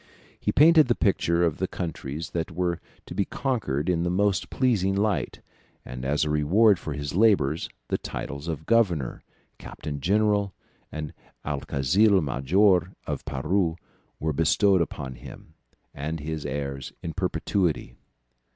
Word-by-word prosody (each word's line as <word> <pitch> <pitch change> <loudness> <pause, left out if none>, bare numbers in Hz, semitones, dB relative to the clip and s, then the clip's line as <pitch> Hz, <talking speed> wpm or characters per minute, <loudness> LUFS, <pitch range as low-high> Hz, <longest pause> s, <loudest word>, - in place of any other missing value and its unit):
He - - 0
painted 155 0 +6
the 120 - +2
picture 85 -4 +2
of 80 -4 +1
the - - 0
countries 80 -2 -5
that 85 -1 -2
were 85 0 -1 0.3
to - - -8
be 100 - +1
conquered 105 - -2
in 90 -2 +1
the 85 - 0
most 95 +1 +1
pleasing 105 -7 +1
light, 100 -4 -1 0.4
and 65 0 -7
as 75 +3 +1
a - - -2
reward 90 +7 +4
for 75 - -5
his 70 0 -4
labours 90 -8 +3 0.2
the - - -1
titles 70 +2 -6
of 80 -2 -4
governor, 90 - +1 0.4
captain 70 -1 -6
general, 105 +2 +2 0.4
and 75 -1 -5 0.3
alguazil 80 +8 +2
major 90 +6 +2
of - - -4
Peru 85 +5 0 0.4
were 80 0 -1
bestowed 90 +5 +3
upon 70 -4 -4
him 80 - -12 0.4
and 80 +3 -4
his 80 0 -4
heirs 70 -1 -4
in 80 - -4
perpetuity. 90 - -1
85 Hz, 140 wpm, -26 LUFS, 75-100 Hz, 0.4 s, painted